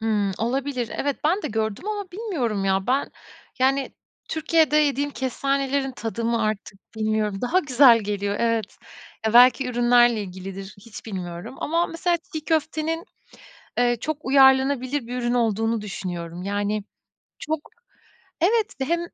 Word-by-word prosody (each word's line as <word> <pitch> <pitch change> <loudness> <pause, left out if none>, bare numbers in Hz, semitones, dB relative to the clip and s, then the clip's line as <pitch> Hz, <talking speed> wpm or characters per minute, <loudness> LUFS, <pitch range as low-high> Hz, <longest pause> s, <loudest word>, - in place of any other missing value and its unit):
Imm, 210 -3 0
olabilir. 255 0 -2
Evet, 285 -1 -1
ben 365 +7 +2
de - - -2
gördüm 220 - -2
ama 410 -3 -4
bilmiyorum 305 - -2
ya 190 0 +1
ben, 265 +3 +1 0.5
yani, 265 +1 +1 0.4
Türkiye'de 320 -1 +2
yediğim 290 -1 +2
kestanelerin 275 0 -1
tadı 230 -1 -4
mı 230 -1 +1
artık 215 -2 -3 0.2
bilmiyorum, 215 -2 -1
daha 285 +9 +2
güzel 260 -7 +6
geliyor, 205 -1 -2
evet. 230 -3 -1 0.5
Ya, 220 - +1
belki 250 +2 +6
ürünlerle 240 -2 +4
ilgilidir. 190 +1 -8
Hiç 225 +1 -11
bilmiyorum 175 -1 -6
ama 335 +3 0
mesela 345 +1 0 0.2
çiğ 310 -1 -5
köftenin, 320 +1 -1 0.7
eee, 240 0 +3
çok 310 -1 -2
uyarlanabilir 265 -1 +4
bir 250 +1 -4
ürün 240 0 0
olduğunu 225 -1 +1
düşünüyorum. 175 -3 -6
Yani, 205 +1 -1 0.6
çok 315 +1 -2 0.8
Evet 440 +3 +2
ve - - +1
hem 340 +5 0
245 Hz, 140 wpm, -24 LUFS, 215-285 Hz, 0.8 s, güzel